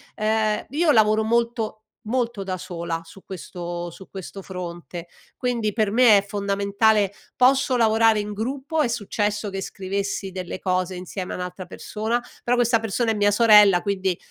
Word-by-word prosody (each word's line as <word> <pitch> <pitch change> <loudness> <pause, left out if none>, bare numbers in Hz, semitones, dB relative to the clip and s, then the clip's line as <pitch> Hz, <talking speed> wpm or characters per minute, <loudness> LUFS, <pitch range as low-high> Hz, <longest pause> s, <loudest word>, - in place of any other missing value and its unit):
Ehm, 215 0 0
io 305 +3 +2
lavoro 215 -1 +4
molto 230 -1 -1 0.2
molto 235 -2 -2
da 185 -1 -3
sola 170 -2 -5
su 195 +3 -15
questo 175 -1 -6
su 190 - -13
questo 195 +1 -8
fronte, 175 -2 -7 0.3
quindi 235 -5 -1
per 215 -3 +1
me 230 -3 +6
è 200 - -7
fondamentale. 200 0 +1 0.2
Posso 260 0 +3
lavorare 225 -1 +4
in 210 0 -4
gruppo, 270 +8 -2
è 280 - +2
successo 210 -2 -2
che 195 0 -4
scrivessi 195 0 -4
delle 185 0 -6
cose 185 0 -1
insieme 180 +1 -6
a - - -3
un'altra 180 0 -6
persona, 220 +3 -3 0.2
però 245 +1 +2
questa 240 -1 +3
persona 225 +1 -1
è - - +1
mia 205 0 +3
sorella 210 -4 +6
quindi, 190 -3 -1
210 Hz, 160 wpm, -23 LUFS, 190-225 Hz, 0.3 s, me